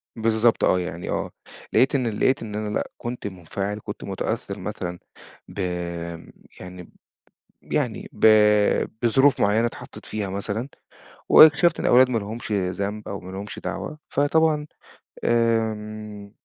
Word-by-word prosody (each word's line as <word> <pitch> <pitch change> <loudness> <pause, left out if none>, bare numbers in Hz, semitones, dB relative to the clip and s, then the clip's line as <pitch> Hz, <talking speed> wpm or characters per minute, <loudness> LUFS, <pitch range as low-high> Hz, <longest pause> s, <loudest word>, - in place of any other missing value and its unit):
بالضبط 115 +1 +2
آه، 90 - +3
يعني 90 -1 -5
آه، - - -2 0.4
لقيت 135 +2 +4
إن 130 -3 +1
ال 105 -2 -3
لقيت 130 - +2
إن 105 -2 -6
أنا 105 0 -3
لأ، 105 - -3
كنت 120 -2 -5
منفعل، 100 +2 -5
كنت - - -7
متأثر - - -4
مثلًا 90 0 -5 0.5
ب - - -10 1.0
يعني 90 -1 -10 0.7
يعني - - -2
ب - - +2 0.8
بظروف 135 +4 +4
معيّنة 110 +3 +3
اتحطيت 120 - -9
فيها 105 -2 -3
مثلًا، 100 +5 -3 0.6
واكتشفت 160 +3 +7
إن - - -2
الأولاد 125 +1 +6
ما 120 - 0
لهمش 110 +2 -7
ذنب 100 +2 -2
أو 100 - -5
ما 90 0 -10
لهمش 100 +2 -7
دعوة. 155 - -5
فطبعًا 150 +1 +2 0.6
آآ، 110 -3 -1
110 Hz, 135 wpm, -24 LUFS, 100-120 Hz, 1.0 s, واكتشفت